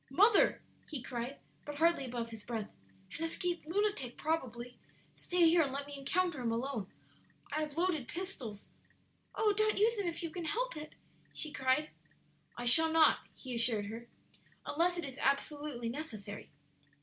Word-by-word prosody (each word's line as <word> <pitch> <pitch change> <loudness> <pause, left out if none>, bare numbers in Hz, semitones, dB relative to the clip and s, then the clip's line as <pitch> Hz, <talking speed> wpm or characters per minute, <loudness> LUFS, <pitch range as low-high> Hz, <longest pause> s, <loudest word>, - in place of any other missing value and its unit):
"Mother!" 405 - +5 0.3
he 295 - -3
cried, 245 +2 -4 0.3
but 295 - -6
hardly 330 -2 +3
above 235 -2 -4
his 220 -2 -8
breath, 225 -3 -4 0.4
"an 325 - -4
escaped 345 0 -1
lunatic, 375 - 0
probably! 250 -6 -2 0.3
Stay 355 -1 +3
here 335 +1 +6
and 280 -4 +1
let 280 +1 -3
me 285 0 -6
encounter 315 +2 0
him 235 -2 0
alone. 230 -3 -2 0.6
I 305 +2 0
have 305 0 -4
loaded 335 -8 +1
pistols 270 - -5 0.3
" - - -30
"Oh, 430 -1 +3
don't 430 +1 +3
use 450 +2 +4
them 400 -3 -1
if 340 0 -3
you 330 - -3
can 350 -1 -5
help - - -1
it!" 305 0 -8 0.4
she 305 - -2
cried. 270 +2 +1 0.7
"I 245 - -4
shall 320 +7 +6
not," 320 -1 +6 0.2
he 255 -2 -7
assured 230 -3 +1
her, 225 +3 -7 0.6
"unless 350 +4 +2
it 345 - -2
is 270 -1 -7
absolutely 280 -3 0
necessary." 220 -7 -6
290 Hz, 165 wpm, -34 LUFS, 245-340 Hz, 0.7 s, here